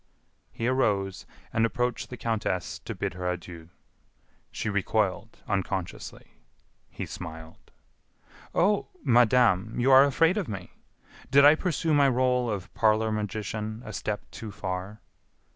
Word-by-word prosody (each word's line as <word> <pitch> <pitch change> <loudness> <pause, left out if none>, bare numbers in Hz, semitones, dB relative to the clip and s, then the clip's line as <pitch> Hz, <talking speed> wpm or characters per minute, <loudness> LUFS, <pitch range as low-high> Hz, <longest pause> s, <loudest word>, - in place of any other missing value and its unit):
He 115 - -4
arose 100 -7 0 0.3
and 115 - +2
approached 120 +2 -1
the 125 - -7
countess 110 -7 -2
to - - -5
bid - - -3
her 90 0 -3
adieu. 85 -2 -7 0.8
She - - -4
recoiled, 105 0 -1
unconsciously. 95 -2 -4 0.5
He - - -6
smiled. 80 0 -9 0.9
"Oh! 200 +4 +2 0.2
Madame, 115 -3 +3
you 130 +3 +3
are 135 +1 +9
afraid 165 +7 +3
of 200 - -1
me! 95 -4 -6 0.6
Did 140 +2 +6
I 145 - +9
pursue 160 -1 -1
my 140 -2 +5
role 125 -1 +1
of 100 -4 -5
parlor 110 0 +2
magician 110 +1 -4
a 110 - -7
step 105 0 -3
too 110 - -7
far?" 95 +1 -5
110 Hz, 130 wpm, -27 LUFS, 95-125 Hz, 0.9 s, are